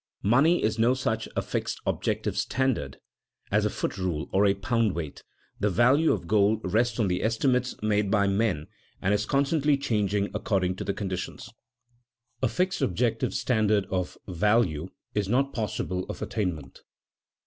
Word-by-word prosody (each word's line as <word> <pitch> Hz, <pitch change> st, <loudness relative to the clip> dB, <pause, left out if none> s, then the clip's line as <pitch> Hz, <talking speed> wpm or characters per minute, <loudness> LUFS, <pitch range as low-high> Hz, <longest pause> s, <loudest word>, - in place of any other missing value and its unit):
Money 140 Hz, -, +4 dB
is 110 Hz, +1 st, 0 dB
no 120 Hz, +3 st, +4 dB
such 110 Hz, -4 st, -2 dB
a -, -, 0 dB
fixed -, -, -3 dB
objective -, -, -1 dB
standard 130 Hz, -1 st, -1 dB, 0.5 s
as -, -, +3 dB
a -, -, +2 dB
foot -, -, -3 dB
rule 85 Hz, -5 st, -2 dB
or 100 Hz, +2 st, +4 dB
a 100 Hz, -, +3 dB
pound 110 Hz, +1 st, 0 dB
weight. 80 Hz, -4 st, -5 dB, 0.4 s
The 105 Hz, -, +2 dB
value 130 Hz, -, +4 dB
of -, -, -1 dB
gold 105 Hz, +3 st, +3 dB
rests 115 Hz, +5 st, +1 dB
on 105 Hz, -, +2 dB
the 90 Hz, -1 st, 0 dB
estimates 125 Hz, +3 st, +1 dB
made 105 Hz, -1 st, +1 dB
by 100 Hz, -1 st, +3 dB
men, 100 Hz, -6 st, +1 dB, 0.3 s
and 100 Hz, -, +1 dB
is 105 Hz, +1 st, 0 dB
constantly 140 Hz, +1 st, +2 dB
changing 105 Hz, -6 st, 0 dB
according 95 Hz, -3 st, 0 dB
to 100 Hz, -, -2 dB
conditions. 95 Hz, -2 st, -5 dB, 0.9 s
A 130 Hz, -, +3 dB
fixed 185 Hz, +8 st, -1 dB
objective 115 Hz, +4 st, 0 dB
standard 110 Hz, -4 st, +2 dB
of 90 Hz, -1 st, -2 dB
value 95 Hz, -3 st, +1 dB, 0.2 s
is 100 Hz, -2 st, -1 dB
not 135 Hz, +4 st, +1 dB
possible 95 Hz, -4 st, -2 dB
of -, -, -5 dB
attainment. 90 Hz, -10 st, -4 dB
105 Hz, 155 wpm, -27 LUFS, 95-120 Hz, 0.9 s, Money